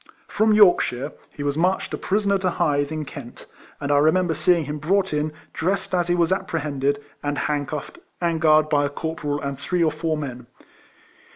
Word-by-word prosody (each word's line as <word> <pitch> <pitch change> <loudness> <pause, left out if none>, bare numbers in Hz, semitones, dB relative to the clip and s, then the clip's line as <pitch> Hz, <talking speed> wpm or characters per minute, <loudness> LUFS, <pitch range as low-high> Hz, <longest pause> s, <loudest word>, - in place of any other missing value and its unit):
From 220 0 +2
Yorkshire 155 - +4 0.2
he 145 - -7
was 145 +1 -1
marched 185 +3 0
a - - +1
prisoner 200 0 +1
to 185 -1 +1
Hythe, 145 -3 0
in 155 -1 -3
Kent; 130 -3 -10 0.3
and 145 0 -2
I 145 - +5
remember 165 +3 +3
seeing 160 +1 +2
him 150 +2 -4
brought 190 +4 +1
in, 150 +1 0 0.2
dressed 190 +3 -1
as 175 -2 +1
he 175 - +2
was 170 0 +2
appre 175 -4 -1
hended, 140 -1 -1 0.2
and 145 0 -2
handcuffed, 145 -1 -3 0.2
and 170 -2 0
guarded 155 -1 +5
by 145 -1 +3
a 140 - 0
corporal 145 -1 -3
and 140 -1 -4
three 180 +3 0
or 160 - +3
four 160 +1 -2
men. 125 -5 -6
155 Hz, 190 wpm, -23 LUFS, 145-175 Hz, 0.3 s, I